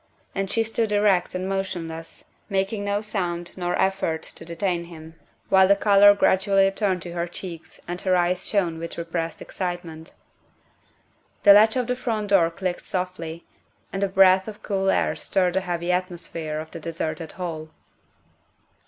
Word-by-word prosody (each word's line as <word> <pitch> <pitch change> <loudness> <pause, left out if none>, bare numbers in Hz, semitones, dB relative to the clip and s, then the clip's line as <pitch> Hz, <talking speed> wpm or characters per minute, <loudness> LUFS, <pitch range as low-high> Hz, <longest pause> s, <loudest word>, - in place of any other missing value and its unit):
And 195 -1 -2
she 225 - +2
stood 225 -1 -1
erect 205 -4 +2
and 185 +1 -2
motionless, 170 -4 -5 0.2
making 195 +1 -1
no 205 +1 -1
sound 175 -5 -3
nor 175 -1 -2
effort 190 -4 0
to - - -9
de 170 +1 -7
tain 175 -2 -1
him, 160 -1 -12 0.4
while 190 -1 +6
the 200 - +5
color 205 0 +6
gradually 195 0 +3
returned 195 -2 0
to 175 - -7
her 170 0 -2
cheeks 170 -1 -8
and 175 +1 -4
her 185 -1 +2
eyes 180 +1 +1
shone 175 -6 0
with 165 0 -5
repressed 165 -1 -4
excitement. 175 -3 -5 1.3
The 200 - +9
latch 220 +3 +6
of 250 -1 0
the 250 - -1
front 225 -4 -3
door 180 -5 +5
clicked 175 +1 -3
softly, 170 -3 -5 0.5
and 195 +1 -1
a 200 - +1
breath 190 0 +5
of 215 -1 -9
cool 195 -2 0
air - - +1
stirred 180 -2 0
the 190 - +1
heavy 175 -1 -2
atmosphere 170 -4 -3
of 155 0 -8
the 165 - -7
deserted 160 0 -4
hall. 160 -4 -5
185 Hz, 165 wpm, -24 LUFS, 170-195 Hz, 1.3 s, The